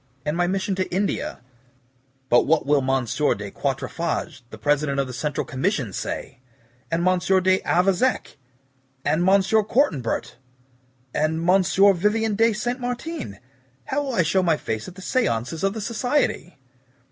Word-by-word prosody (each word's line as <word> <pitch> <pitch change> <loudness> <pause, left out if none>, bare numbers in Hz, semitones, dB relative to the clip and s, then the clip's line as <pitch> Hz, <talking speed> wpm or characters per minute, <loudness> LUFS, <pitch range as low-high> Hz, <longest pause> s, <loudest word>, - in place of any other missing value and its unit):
"And 150 +1 -1
my 175 0 +1
mission 195 +1 -1
to 185 - -2
India. 195 +3 -2 0.9
But 120 -1 +4
what 160 +1 +2
will 145 0 +3
M. 135 -1 0
de 115 -5 -1
Quatre 135 -2 -2
fages, 165 -4 -3
the 110 - -10
President 140 +4 +1
of 135 - +1
the 125 - -8
Central 145 +4 -2
Commission, 135 - -1
say? - - -5 0.5
And 170 +2 0
M. 185 0 +3
d' 185 +1 +2
Avezac? 195 +8 +1 0.7
And 160 - +2
M. 195 0 +5
Cortanbert? 205 - 0 0.8
And 160 +2 0
M. 190 +1 +5 0.3
Vivien 210 +4 +1
de 225 +2 +4
Saint 240 +4 -2
Martin? 245 - -5 0.5
How 265 - -3
shall 265 -3 -3
I 180 - +3
show 175 +5 +2
my 165 -4 +2
face 110 -4 -4
at 180 - -10
the 190 - -10
SEANCES 160 - -1
of 195 0 +1
the 220 - -4
Society?" 230 - -1
180 Hz, 155 wpm, -23 LUFS, 145-205 Hz, 0.9 s, M